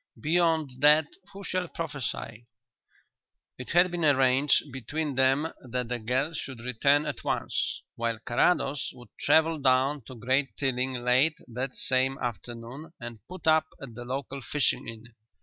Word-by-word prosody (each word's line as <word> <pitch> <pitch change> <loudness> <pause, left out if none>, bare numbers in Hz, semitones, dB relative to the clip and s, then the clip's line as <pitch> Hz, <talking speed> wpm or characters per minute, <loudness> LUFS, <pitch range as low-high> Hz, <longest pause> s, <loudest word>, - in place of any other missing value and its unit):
"Beyond 160 -2 +1
that 150 +1 +6 0.3
who 200 0 -10
shall 185 -2 -2
prophesy?" 130 -8 -5 1.1
It 125 - -7
had 175 +1 +4
been 175 -1 -2
arranged 140 0 +3
between 145 +4 -3
them 135 +4 +2
that 125 -1 -4
the 125 0 -2
girl 130 +8 0
should 135 -5 -6
return 140 +5 +2
at - - -5
once, - - -2
while 115 -1 -1
Carrados 135 +4 +1
would 120 -1 -14
travel 160 0 +3
down 135 +2 +2
to 130 - -10
Great 130 +4 0
Tilling 130 -1 0
late 130 +6 +3
that 125 +2 -4
same 130 +1 +1
afternoon 120 - -6
and 120 -2 -7
put 185 +1 -9
up 155 0 +4
at 135 -4 -9
the 120 +2 -8
local 135 +2 -5
fishing 140 +4 0
inn. 115 -1 -8
135 Hz, 150 wpm, -28 LUFS, 125-150 Hz, 1.1 s, that